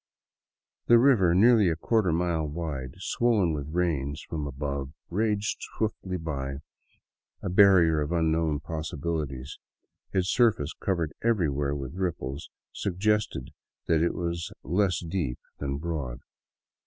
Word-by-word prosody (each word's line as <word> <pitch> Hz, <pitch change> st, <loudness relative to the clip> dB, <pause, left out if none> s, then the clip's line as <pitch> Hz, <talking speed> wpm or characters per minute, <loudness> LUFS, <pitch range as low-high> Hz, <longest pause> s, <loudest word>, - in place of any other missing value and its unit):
The 120 Hz, -, +8 dB
river, 115 Hz, -9 st, +5 dB
nearly 110 Hz, -1 st, +6 dB
a 80 Hz, -, 0 dB
quarter 100 Hz, +3 st, +1 dB
mile 80 Hz, -2 st, 0 dB
wide, 75 Hz, -4 st, -4 dB
swollen 100 Hz, -3 st, +1 dB
by 75 Hz, -, -2 dB
the 70 Hz, -, -8 dB
rains 75 Hz, -4 st, -1 dB
above, 70 Hz, -2 st, -3 dB, 0.2 s
raged 105 Hz, +2 st, 0 dB, 0.2 s
swiftly 100 Hz, -4 st, -2 dB
by, 70 Hz, -4 st, -4 dB, 0.8 s
a -, -, -1 dB
barrier 90 Hz, -5 st, +6 dB
of 75 Hz, +2 st, -2 dB
unknown 80 Hz, -3 st, +1 dB
possibilities. 75 Hz, -3 st, -4 dB, 0.5 s
Its 95 Hz, -1 st, +1 dB
surface, 110 Hz, -, +2 dB
covered 85 Hz, -5 st, -2 dB
everywhere 75 Hz, -11 st, +1 dB
with 70 Hz, -1 st, -5 dB
ripples, 85 Hz, -6 st, -3 dB, 0.2 s
suggested 100 Hz, -7 st, -1 dB, 0.3 s
that 80 Hz, -1 st, +2 dB
it 85 Hz, -, +1 dB
was 85 Hz, -1 st, -3 dB
less 90 Hz, +4 st, +1 dB
deep 80 Hz, -8 st, -2 dB, 0.2 s
than 70 Hz, -1 st, -2 dB
broad. 70 Hz, -6 st, -4 dB
80 Hz, 120 wpm, -27 LUFS, 70-95 Hz, 0.8 s, The